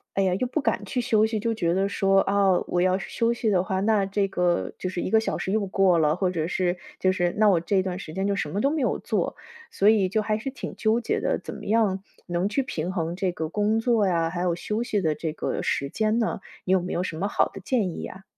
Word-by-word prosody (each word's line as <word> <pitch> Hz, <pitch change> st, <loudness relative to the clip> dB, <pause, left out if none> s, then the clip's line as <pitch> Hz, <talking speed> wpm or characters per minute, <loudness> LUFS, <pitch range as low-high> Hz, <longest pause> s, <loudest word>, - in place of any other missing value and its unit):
哎 195 Hz, -, +2 dB
呀， 185 Hz, -1 st, +2 dB
又 225 Hz, +7 st, -1 dB
不 310 Hz, -, -1 dB
敢 225 Hz, -6 st, 0 dB
去 250 Hz, +5 st, -2 dB
休 220 Hz, -3 st, +3 dB
息， 220 Hz, -1 st, -1 dB
就 230 Hz, +1 st, 0 dB
觉 170 Hz, -6 st, 0 dB
得 195 Hz, +2 st, +1 dB
说， 195 Hz, -1 st, +3 dB
啊， 195 Hz, 0 st, +2 dB, 0.2 s
我 175 Hz, 0 st, 0 dB
要 185 Hz, +1 st, +2 dB
是 -, -, -7 dB
休 230 Hz, 0 st, +1 dB
息 235 Hz, -1 st, -1 dB
的 185 Hz, -3 st, +2 dB
话， 190 Hz, 0 st, -1 dB
那 210 Hz, 0 st, +2 dB
这 195 Hz, 0 st, 0 dB
个 180 Hz, -2 st, 0 dB
就 185 Hz, -, -3 dB
是 180 Hz, -, -3 dB
1 -, -, -2 dB
个 220 Hz, +3 st, +4 dB
小 220 Hz, -, -2 dB
时 -, -, -3 dB
又 215 Hz, -1 st, +1 dB
过 190 Hz, -2 st, +3 dB
了， 155 Hz, -1 st, +2 dB
或 190 Hz, -, +1 dB
者 165 Hz, -3 st, -2 dB
是， 180 Hz, 0 st, 0 dB, 0.2 s
就 185 Hz, -, +3 dB
是 175 Hz, -1 st, 0 dB
那 215 Hz, -1 st, +5 dB
我 180 Hz, -5 st, +4 dB
这 190 Hz, +3 st, +1 dB
段 185 Hz, -1 st, -3 dB
时 160 Hz, -5 st, -8 dB
间 190 Hz, +3 st, -1 dB
就 200 Hz, 0 st, 0 dB
什 150 Hz, -6 st, -2 dB
么 200 Hz, -, -2 dB
都 275 Hz, -, +2 dB
没 310 Hz, -1 st, -1 dB
有 -, -, 0 dB
做， -, -, -2 dB, 0.3 s
所 200 Hz, -, +2 dB
以 205 Hz, -4 st, +4 dB
就 215 Hz, -, +1 dB
还 215 Hz, 0 st, 0 dB
是 235 Hz, +5 st, -4 dB
挺 260 Hz, -, -7 dB
纠 220 Hz, +1 st, +2 dB
结 -, -, -1 dB
的， -, -, -1 dB
怎 -, -, -7 dB
么 -, -, -9 dB
样 205 Hz, -3 st, +1 dB, 0.2 s
能 175 Hz, +1 st, -1 dB
去 215 Hz, +7 st, 0 dB
平 175 Hz, -8 st, -3 dB
衡 170 Hz, -2 st, -2 dB
这 185 Hz, -1 st, 0 dB
个 160 Hz, -2 st, -4 dB
工 210 Hz, +5 st, +1 dB
作 225 Hz, -3 st, +2 dB
呀， 165 Hz, -3 st, +1 dB
还 175 Hz, +1 st, -3 dB
有 180 Hz, -1 st, +1 dB
休 210 Hz, +6 st, -3 dB
息 220 Hz, -4 st, 0 dB
的 160 Hz, -4 st, +1 dB
这 160 Hz, 0 st, -4 dB
个 155 Hz, -, -3 dB
时 140 Hz, -, -1 dB
间 215 Hz, +8 st, 0 dB
呢？ 220 Hz, -4 st, -1 dB, 0.2 s
你 185 Hz, -, +2 dB
有 190 Hz, -, +3 dB
没 180 Hz, -, -4 dB
有 175 Hz, -, 0 dB
什 165 Hz, -, -4 dB
么 185 Hz, +5 st, -1 dB
好 205 Hz, -, +1 dB
的 -, -, -10 dB
建 220 Hz, -2 st, +1 dB
议 -, -, -6 dB
呀？ 190 Hz, +1 st, -8 dB
195 Hz, 295 characters per minute, -25 LUFS, 180-215 Hz, 0.3 s, 那